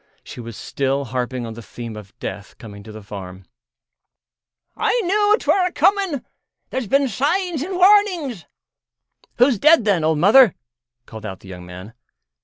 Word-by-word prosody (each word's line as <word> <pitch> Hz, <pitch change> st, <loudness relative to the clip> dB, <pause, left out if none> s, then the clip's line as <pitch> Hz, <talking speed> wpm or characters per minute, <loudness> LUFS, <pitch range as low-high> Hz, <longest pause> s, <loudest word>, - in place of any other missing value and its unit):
She -, -, -10 dB
was 115 Hz, -3 st, -8 dB
still 140 Hz, 0 st, -2 dB
harping 125 Hz, 0 st, -3 dB
on 115 Hz, -, -7 dB
the 115 Hz, -, -10 dB
theme 115 Hz, 0 st, -8 dB
of 105 Hz, -2 st, -12 dB
death 100 Hz, +1 st, -7 dB
coming 100 Hz, -3 st, -11 dB
to 110 Hz, +2 st, -12 dB
the 110 Hz, 0 st, -11 dB
farm. 95 Hz, -2 st, -9 dB, 1.3 s
"I -, -, +1 dB
knew 415 Hz, +2 st, +2 dB
'twere 370 Hz, -2 st, +2 dB
a -, -, -5 dB
coming. 385 Hz, -9 st, +1 dB, 0.5 s
There's 260 Hz, -4 st, -3 dB
been 275 Hz, +5 st, +2 dB
signs 310 Hz, -, -1 dB
an' 365 Hz, +4 st, -4 dB
warnings." 365 Hz, -, +3 dB, 0.9 s
"Who's 245 Hz, -3 st, +3 dB
dead, 305 Hz, -3 st, +5 dB
then, 195 Hz, -6 st, +2 dB
old 160 Hz, 0 st, +2 dB
Mother?" 210 Hz, -, +6 dB, 0.5 s
called 110 Hz, -2 st, -11 dB
out 95 Hz, -3 st, -7 dB
the 95 Hz, -, -14 dB
young 90 Hz, -1 st, -10 dB
man. 90 Hz, +5 st, -10 dB
165 Hz, 160 wpm, -20 LUFS, -, 1.3 s, Mother